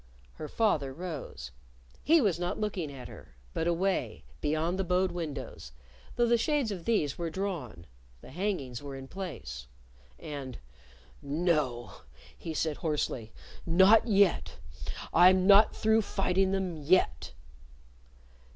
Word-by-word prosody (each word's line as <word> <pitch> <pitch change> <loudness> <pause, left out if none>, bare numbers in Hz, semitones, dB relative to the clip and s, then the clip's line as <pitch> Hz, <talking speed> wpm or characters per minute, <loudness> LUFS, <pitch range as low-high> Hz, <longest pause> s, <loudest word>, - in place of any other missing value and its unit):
Her 155 - -7
father 155 -10 +1
rose. 155 - -7 0.5
He 325 +1 +5
was 195 -8 +1
not 175 0 -2
looking 195 -8 -2
at 130 -3 -9
her - - -14 0.2
but 165 - -1
away, 185 +3 -1 0.2
beyond 160 +5 0
the - - +1
bowed 185 +1 +1
windows, 140 - -6 0.4
though 240 - +3
the 235 0 +3
shades 285 -3 +1
of 180 -4 -6
these 165 -12 0
were 170 -1 -2
drawn, 160 - -5 0.3
the - - -13
hangings 145 - -3
were 140 -1 -7
in 135 0 -8
place. 125 - -7 0.5
And, 140 -4 -7 0.6
"No!" 145 -6 -1 0.3
he 165 - -6
said 155 -1 -1
hoarsely; 145 -8 -2 0.3
"not 190 +7 +5
yet! 200 -3 +2 0.6
I'm 185 +2 +6
not 200 +2 +6
through 220 +1 +3
fighting 190 -2 +1
them 185 -5 -2
_yet! 185 +6 +2
175 Hz, 130 wpm, -30 LUFS, 145-195 Hz, 0.6 s, I'm